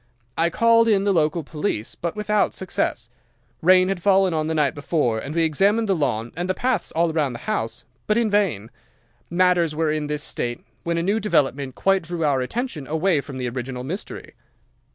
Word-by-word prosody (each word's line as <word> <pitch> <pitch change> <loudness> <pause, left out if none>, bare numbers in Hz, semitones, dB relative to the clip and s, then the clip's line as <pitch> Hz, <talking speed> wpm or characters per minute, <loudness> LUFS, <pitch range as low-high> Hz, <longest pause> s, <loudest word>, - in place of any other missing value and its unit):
I 165 +1 +2
called 230 +4 +4
in 200 -3 +3
the 200 -1 +2
local 160 0 +1
police, 150 - -3
but 170 -1 -4
without 210 0 0
success. 120 -10 -3 0.5
Rain 185 +2 +5
had 190 -2 -2
fallen 190 -1 +3
on 155 -1 -1
the 160 - -1
night 150 -4 +2
before 145 -6 0
and 145 +7 -6
we 165 - +3
examined 200 +8 +2
the 195 - +2
lawn 120 -7 -1
and 175 +3 -3
the 185 - +1
paths 250 -6 -1
all 165 0 +1
round 145 -6 0
the - - -7
house, 215 -1 -3 0.2
but 215 - +2
in 230 -3 +1
vain. 165 - 0 0.6
Matters 175 -3 +2
were 160 -1 +1
in 155 -1 -2
this 150 0 -2
state, 120 0 -3 0.2
when 170 0 -2
a 170 - 0
new 200 +5 +1
development 140 - 0
quite 195 -1 +2
drew 165 -1 -3
our 140 -3 +2
attention 160 - -4
away 160 0 +1
from 140 -2 -9
the 125 -1 -3
original 125 +1 -5
mystery. 175 +10 -6
165 Hz, 195 wpm, -23 LUFS, 145-195 Hz, 0.6 s, Rain